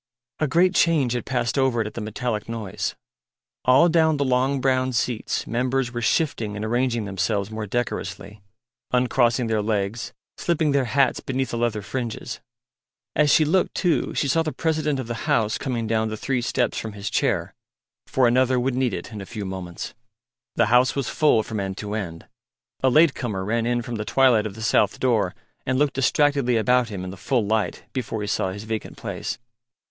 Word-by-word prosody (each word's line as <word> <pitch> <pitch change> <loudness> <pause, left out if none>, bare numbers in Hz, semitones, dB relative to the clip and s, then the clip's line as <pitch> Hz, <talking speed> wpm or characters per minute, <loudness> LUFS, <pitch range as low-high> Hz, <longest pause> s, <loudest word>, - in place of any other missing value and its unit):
A 155 - +1
great 180 +6 +3
change 150 -9 +3
had 120 - -3
passed 125 0 0
over 130 -3 +2
it 110 - +1
at 105 - -6
the 115 - -5
metallic 110 +1 -3
noise. 105 -3 -3 0.7
All 130 +7 +6
down 160 -2 +3
the 140 - +1
long 130 +2 +2
brown 130 0 +1
seats 115 -1 -1
members 125 +1 0
were 120 -1 -4
shifting 115 -5 0
and 105 +1 -3
arranging 120 -1 0
themselves 100 +1 -1
more 110 -1 -4
decorously, 100 -2 -4 0.5
uncrossing 125 -1 +2
their 110 -1 0
legs, 105 +1 -2 0.3
slipping 160 -3 +1
their 140 -2 +2
hats 130 +3 +2
beneath 130 0 -2
the 120 - -2
leather 110 -3 0
fringes. 120 -1 -4 0.8
As 150 0 +4
she 155 - +5
looked, 180 +5 +1
too, 175 -4 +1
she 145 - +1
saw 165 +5 +3
the 160 -1 -2
President 155 -3 0
of 130 - -3
the 115 0 -5
House 110 -2 +2
coming 120 -5 -2
down 110 0 0
the 110 - -4
three 130 +2 -1
steps 120 0 0
from 110 -2 -6
his 100 0 -6
chair, - - 0 0.5
for 130 -2 +3
Another 130 +1 +3
would 130 +1 0
need 125 -4 0
it 90 +7 -7
in 105 -2 -6
a - - -7
few 105 -4 -5
moments. 95 -2 -6 0.6
The - - +4
house 125 +1 +4
was 135 -5 -1
full 145 -8 +3
from 110 0 -4
end 95 0 -3
to 105 -1 -5
end; 85 -6 -5 0.6
a 130 - +4
late 155 +2 +5
comer 105 -7 -3
ran 115 +2 0
in 120 0 0
from 120 0 -5
the 105 - -2
twilight 120 -5 +4
of 100 - -9
the 110 - -7
south 105 -2 +2
door 110 -8 +1 0.3
and 130 0 0
looked 145 0 +2
distractedly 135 -2 +2
about 125 +1 +2
him 100 -4 -5
in 95 - -5
the 95 - -9
full 120 +3 0
light 105 -4 -1
before 115 -4 -3
he 105 - -3
saw 95 -3 0
his 100 +2 -7
vacant 110 0 -5
place. - - -4
120 Hz, 195 wpm, -24 LUFS, 110-130 Hz, 0.8 s, All